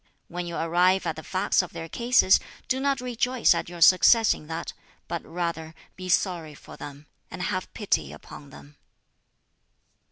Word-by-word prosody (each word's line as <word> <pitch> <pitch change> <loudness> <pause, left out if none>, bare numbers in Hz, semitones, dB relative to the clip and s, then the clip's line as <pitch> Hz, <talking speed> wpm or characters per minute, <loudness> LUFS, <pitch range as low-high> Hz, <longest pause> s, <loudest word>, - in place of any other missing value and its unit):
When 175 0 -5
you 170 - -5
arrive 180 +3 +2
at 165 -2 -2
the 160 - -8
facts 185 +3 +1
of 180 - -9
their 165 - -6
cases, 235 -1 +4 0.3
do 260 - 0
not 275 -1 0
rejoice 250 0 +2
at - - -4
your 175 -1 -10
success 210 +6 +6
in 150 - -12
that, 165 +1 -5 0.3
but 170 - -4
rather 165 -2 -4 0.2
be 185 0 -8
sorry 170 -5 0
for - - -13
them, 145 +1 -10 0.2
and 180 - -6
have 185 +1 -3
pity 80 - -1
upon 140 - -12
them." 145 +1 -15
175 Hz, 165 wpm, -26 LUFS, 160-195 Hz, 0.3 s, success